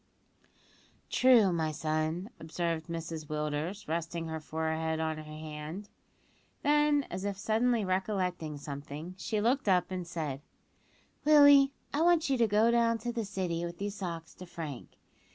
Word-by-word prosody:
"True, 235 Hz, -8 st, +5 dB
my 160 Hz, -2 st, 0 dB
son," 155 Hz, -, -2 dB
observed 160 Hz, 0 st, -3 dB
Mrs 165 Hz, -2 st, -5 dB
Willders, 150 Hz, +6 st, -3 dB
resting 165 Hz, +1 st, -3 dB
her 160 Hz, 0 st, -3 dB
forehead 160 Hz, +1 st, -2 dB
on 160 Hz, -1 st, -1 dB
her -, -, -6 dB
hand; 155 Hz, +5 st, -7 dB, 0.7 s
then, 295 Hz, -1 st, +3 dB
as 185 Hz, +2 st, -4 dB
if 200 Hz, -1 st, -2 dB
suddenly 225 Hz, +2 st, +1 dB
recollecting 185 Hz, -5 st, -1 dB
something, 145 Hz, +4 st, -7 dB
she 220 Hz, +1 st, -1 dB
looked 240 Hz, +2 st, +1 dB
up 180 Hz, -1 st, +3 dB
and 180 Hz, -2 st, -4 dB
said, 155 Hz, -5 st, -4 dB, 0.8 s
"Willie, 285 Hz, -2 st, +7 dB, 0.2 s
I 290 Hz, -, +1 dB
want 335 Hz, -3 st, +4 dB
you 265 Hz, -, +3 dB
to 230 Hz, -, +4 dB
go 215 Hz, +3 st, +4 dB
down 230 Hz, -1 st, +3 dB
to 240 Hz, +2 st, -4 dB
the 230 Hz, -1 st, -2 dB
City 180 Hz, -4 st, -2 dB
with 170 Hz, 0 st, -5 dB
these 200 Hz, +1 st, -3 dB
socks 170 Hz, -5 st, -6 dB
to 180 Hz, -, -10 dB
Frank. 155 Hz, -7 st, -7 dB
175 Hz, 150 wpm, -31 LUFS, 160-220 Hz, 0.8 s, Willie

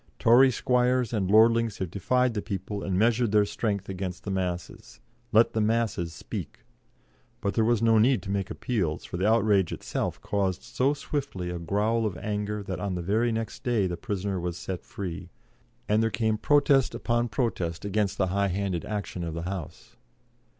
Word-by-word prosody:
Tory 125 Hz, +4 st, +6 dB
squires 125 Hz, -1 st, +1 dB
and 100 Hz, -4 st, 0 dB
lordlings 115 Hz, +1 st, +4 dB
have 90 Hz, -3 st, -4 dB
defied 125 Hz, +6 st, +1 dB
the 105 Hz, -, -2 dB
people 100 Hz, 0 st, -4 dB
and 95 Hz, -2 st, -1 dB
measured 115 Hz, +1 st, +2 dB
their 105 Hz, -1 st, +4 dB
strength 100 Hz, -2 st, -2 dB
against 95 Hz, -1 st, -5 dB
the 100 Hz, -, -4 dB
masses. 90 Hz, -3 st, -4 dB, 0.3 s
Let 115 Hz, +1 st, +5 dB
the 110 Hz, -, +1 dB
masses 105 Hz, -6 st, 0 dB
speak." -, -, -7 dB, 0.8 s
But 100 Hz, -, -1 dB
there 115 Hz, -, +2 dB
was 115 Hz, 0 st, +2 dB
no 115 Hz, -1 st, +5 dB
need 120 Hz, -1 st, +3 dB
to 95 Hz, -, -4 dB
make 100 Hz, -1 st, -1 dB
appeals, 95 Hz, -11 st, -2 dB
for -, -, -5 dB
the 95 Hz, +3 st, +1 dB
outrage 105 Hz, -5 st, +3 dB
itself -, -, -3 dB
caused 95 Hz, -3 st, -1 dB
so 135 Hz, +3 st, 0 dB
swiftly 135 Hz, -13 st, -4 dB
a 90 Hz, -, -4 dB
growl 105 Hz, +6 st, +1 dB
of 95 Hz, -, -5 dB
anger 105 Hz, 0 st, -3 dB
that 95 Hz, -3 st, -4 dB
on 95 Hz, 0 st, -2 dB
the 90 Hz, -, -3 dB
very 110 Hz, +6 st, +1 dB
next 115 Hz, 0 st, -4 dB
day 120 Hz, -6 st, +1 dB
the 90 Hz, -1 st, -2 dB
prisoner 100 Hz, -3 st, -3 dB
was 85 Hz, -1 st, -3 dB
set 90 Hz, -1 st, -5 dB
free, 90 Hz, -2 st, -6 dB, 0.6 s
and 105 Hz, +1 st, +3 dB
there 115 Hz, -, +2 dB
came 110 Hz, -1 st, 0 dB
protest 140 Hz, 0 st, +3 dB
upon 120 Hz, 0 st, 0 dB
protest 95 Hz, -7 st, -2 dB
against 100 Hz, -1 st, 0 dB
the 95 Hz, -, +1 dB
high 100 Hz, 0 st, +2 dB
handed 95 Hz, -2 st, -2 dB
action 100 Hz, -4 st, -4 dB
of 80 Hz, -1 st, -4 dB
the 85 Hz, -, -4 dB
House. 90 Hz, -3 st, -7 dB
105 Hz, 185 wpm, -27 LUFS, 95-115 Hz, 0.8 s, Tory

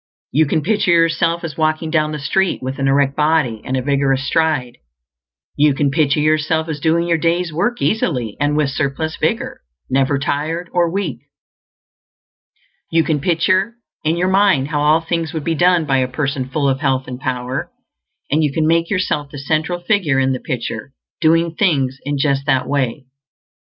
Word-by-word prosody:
You 155 Hz, +1 st, +3 dB
can 155 Hz, +1 st, 0 dB
picture 210 Hz, +1 st, +1 dB
yourself 165 Hz, 0 st, +2 dB
as 160 Hz, -4 st, -6 dB
walking 155 Hz, 0 st, 0 dB
down 155 Hz, -2 st, +1 dB
the 150 Hz, -, -3 dB
street 185 Hz, +6 st, 0 dB
with 130 Hz, +1 st, -4 dB
an 135 Hz, -, +1 dB
erect 140 Hz, 0 st, +2 dB
body 150 Hz, -8 st, +1 dB
and 130 Hz, -, -2 dB
a 130 Hz, -, -2 dB
vigorous 135 Hz, -1 st, +1 dB
stride; 150 Hz, -6 st, 0 dB, 0.8 s
you 145 Hz, -1 st, +3 dB
can 140 Hz, -1 st, +1 dB
picture 150 Hz, -1 st, +2 dB
yourself 155 Hz, +1 st, +1 dB
as 155 Hz, -2 st, -4 dB
doing 165 Hz, +2 st, +1 dB
your 165 Hz, -1 st, +1 dB
day's 170 Hz, 0 st, 0 dB
work 240 Hz, +10 st, -1 dB
easily 125 Hz, -, 0 dB
and 145 Hz, +1 st, +1 dB
with 145 Hz, -3 st, +1 dB
surplus 145 Hz, +3 st, -2 dB
vigor, -, -, -2 dB, 0.3 s
never 135 Hz, +2 st, +2 dB
tired 155 Hz, +5 st, -2 dB
or 175 Hz, -1 st, +2 dB
weak; 175 Hz, -11 st, -3 dB, 1.7 s
you 165 Hz, 0 st, +3 dB
can 150 Hz, 0 st, 0 dB
picture 185 Hz, +7 st, +1 dB, 0.3 s
in 160 Hz, +2 st, +1 dB
your 180 Hz, +1 st, +1 dB
mind 190 Hz, -8 st, +3 dB
how 150 Hz, -2 st, -1 dB
all 155 Hz, +2 st, +4 dB
things 165 Hz, 0 st, -2 dB
would 160 Hz, -2 st, -3 dB
be 165 Hz, -, 0 dB
done 175 Hz, 0 st, +3 dB
by 135 Hz, -2 st, +2 dB
a 130 Hz, -, +1 dB
person 135 Hz, 0 st, -3 dB
full 140 Hz, +1 st, 0 dB
of 135 Hz, -1 st, +1 dB
health 135 Hz, -3 st, 0 dB
and 125 Hz, 0 st, -6 dB
power, 130 Hz, -1 st, -3 dB, 0.6 s
and 155 Hz, +2 st, +2 dB
you 150 Hz, -, +1 dB
can 155 Hz, +2 st, 0 dB
make 165 Hz, +1 st, +2 dB
yourself 185 Hz, -7 st, -1 dB
the 145 Hz, -, -9 dB
central 160 Hz, +5 st, -1 dB
figure 175 Hz, -7 st, +1 dB
in 135 Hz, 0 st, +2 dB
the 130 Hz, -, -3 dB
picture, 115 Hz, 0 st, -5 dB, 0.3 s
doing 165 Hz, 0 st, +3 dB
things 135 Hz, -9 st, +1 dB
in 145 Hz, 0 st, -1 dB
just 140 Hz, 0 st, 0 dB
that 135 Hz, -3 st, +1 dB
way. 135 Hz, -1 st, -1 dB
150 Hz, 185 wpm, -18 LUFS, 135-165 Hz, 1.7 s, all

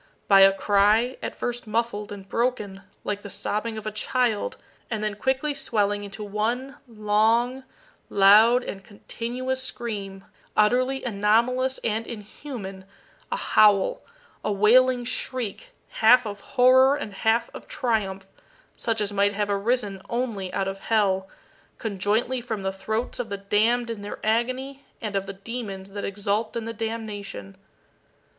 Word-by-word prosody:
by 195 Hz, -1 st, +7 dB
a 195 Hz, 0 st, +8 dB
cry, 205 Hz, +5 st, +3 dB
at -, -, -4 dB
first 240 Hz, -2 st, -4 dB
muffled 215 Hz, -2 st, -2 dB
and 195 Hz, -1 st, -8 dB
broken, 210 Hz, -4 st, -1 dB, 0.2 s
like 205 Hz, 0 st, -3 dB
the 205 Hz, -, -8 dB
sobbing 220 Hz, +3 st, -3 dB
of 215 Hz, -, -7 dB
a 215 Hz, -, -2 dB
child, 245 Hz, -, -1 dB, 0.3 s
and 220 Hz, -2 st, -2 dB
then 215 Hz, -1 st, 0 dB
quickly 265 Hz, +7 st, 0 dB
swelling 205 Hz, -7 st, 0 dB
into 200 Hz, +1 st, -7 dB
one 230 Hz, +6 st, -2 dB
long, 225 Hz, +4 st, +1 dB, 0.5 s
loud, 215 Hz, +5 st, +6 dB
and 195 Hz, -4 st, -7 dB
continuous 245 Hz, +5 st, -4 dB
scream, 200 Hz, -6 st, -5 dB, 0.3 s
utterly 255 Hz, +5 st, +3 dB
anomalous 235 Hz, +4 st, +2 dB
and 225 Hz, 0 st, -1 dB
inhuman 210 Hz, -3 st, -8 dB, 0.5 s
a -, -, +1 dB
howl 205 Hz, -2 st, +4 dB, 0.4 s
a -, -, 0 dB
wailing 245 Hz, +5 st, +4 dB
shriek, 255 Hz, -, -3 dB, 0.2 s
half 245 Hz, +2 st, +5 dB
of 205 Hz, -1 st, -5 dB
horror 260 Hz, +3 st, +5 dB
and 225 Hz, -8 st, -5 dB
half 225 Hz, +4 st, +1 dB
of -, -, -10 dB
triumph, 200 Hz, -6 st, -1 dB, 0.5 s
such 225 Hz, -2 st, -1 dB
as 205 Hz, 0 st, -2 dB
might 200 Hz, 0 st, +2 dB
have 205 Hz, 0 st, 0 dB
arisen 200 Hz, -1 st, -1 dB
only 230 Hz, -6 st, -2 dB
out 195 Hz, +1 st, -1 dB
of 195 Hz, 0 st, -4 dB
hell, 195 Hz, -4 st, +1 dB, 0.5 s
conjointly 220 Hz, +4 st, 0 dB
from 220 Hz, -4 st, -4 dB
the 190 Hz, 0 st, -1 dB
throats 220 Hz, +6 st, -3 dB
of 240 Hz, -2 st, -3 dB
the 200 Hz, -, -3 dB
damned 225 Hz, +4 st, +1 dB
in 220 Hz, -3 st, -6 dB
their 205 Hz, -, -6 dB
agony 255 Hz, +5 st, -1 dB, 0.2 s
and 210 Hz, -3 st, -4 dB
of 195 Hz, 0 st, -1 dB
the 195 Hz, -, -5 dB
demons 195 Hz, -2 st, -6 dB
that 205 Hz, 0 st, -5 dB
exult 205 Hz, +2 st, -2 dB
in 230 Hz, -1 st, -3 dB
the 230 Hz, -, -4 dB
damnation. 210 Hz, -, -5 dB
215 Hz, 145 wpm, -25 LUFS, 200-245 Hz, 0.5 s, a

